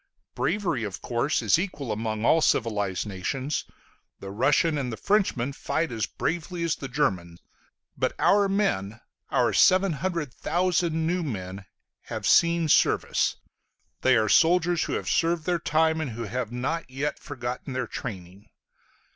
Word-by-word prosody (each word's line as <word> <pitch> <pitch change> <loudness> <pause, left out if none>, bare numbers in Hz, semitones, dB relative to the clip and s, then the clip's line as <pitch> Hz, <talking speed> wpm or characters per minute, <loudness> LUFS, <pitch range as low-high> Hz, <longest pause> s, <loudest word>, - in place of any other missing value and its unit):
Bravery, 185 - -1
of 100 -3 -5
course, 125 +5 0
is - - +4
equal 150 - -4
among 110 +1 -2
all 160 - +4
civilized 105 -9 0
nations; 130 +9 -3 0.5
the 95 - -8
Russian 145 +8 +2
and 135 -4 -2
the 110 - -5
Frenchman 185 - +1
fight 160 +3 -2
as 110 -3 -2
bravely 170 +1 -3
as 165 -2 +1
the 135 - -7
German: 95 - -1 0.6
but - - 0
our 200 0 +3
men, 110 - 0 0.3
our - - +2
700,000 170 -1 +1
new 180 +2 0
men, 95 - -5 0.4
have - - -5
seen 170 -1 +4
service; - - +2 0.7
they 130 -2 +4
are 110 -1 +2
soldiers 175 - +3
who - - -3
have - - -3
served 165 -1 +1
their 175 -1 +1
time, 160 +1 +1
and 150 - -3
who 115 +1 -5
have 115 +1 -4
not 135 +6 -3
yet 135 +3 -3
forgotten 125 -1 -6
their 130 -1 -1
training. 100 -3 -8
140 Hz, 145 wpm, -26 LUFS, 110-170 Hz, 0.7 s, is